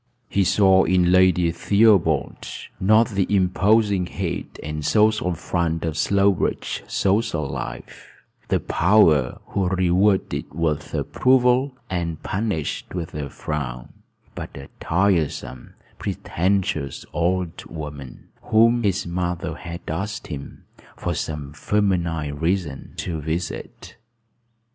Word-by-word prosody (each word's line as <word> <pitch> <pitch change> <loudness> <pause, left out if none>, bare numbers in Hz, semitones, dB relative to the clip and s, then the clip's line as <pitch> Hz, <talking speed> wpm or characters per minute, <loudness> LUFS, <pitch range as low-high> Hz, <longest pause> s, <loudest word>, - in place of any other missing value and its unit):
He 100 - +2
saw 95 0 +5
in 90 0 +3
Lady 90 -2 +4
Theobald, 95 -4 +2 0.3
not 110 +5 +4
the 100 -4 0
imposing 100 0 +2
head - - -3 0.2
and 75 0 -4
social 105 -2 +2
front 80 0 -1
of 80 -2 -2
Slowbridge 100 +3 +1
social 95 -7 0
life, - - -7 0.4
the - - +1
power 80 -8 +3
who 95 -2 0
rewarded 95 +2 +2
with 80 -3 -1
approval 130 +1 +2
and 85 -3 -3
punished 95 -6 -3
with 85 -3 -4
a 75 -2 -4
frown, 65 -6 -5 0.4
but - - -7
a 70 0 -10
tiresome, 85 -7 -1 0.2
pretentious 90 -5 -1
old 90 0 -1
woman, 75 -5 -8
whom 115 +2 +4
his 100 -3 0
mother 90 0 -2
had 85 +2 -7
asked 100 +7 -3
him, 70 -1 -9 0.3
for - - -2
some 75 -2 -4
feminine 85 -6 0
reason, 80 -4 -2
to 80 -4 -3
visit. 80 +3 -5
90 Hz, 110 wpm, -23 LUFS, 80-100 Hz, 0.4 s, saw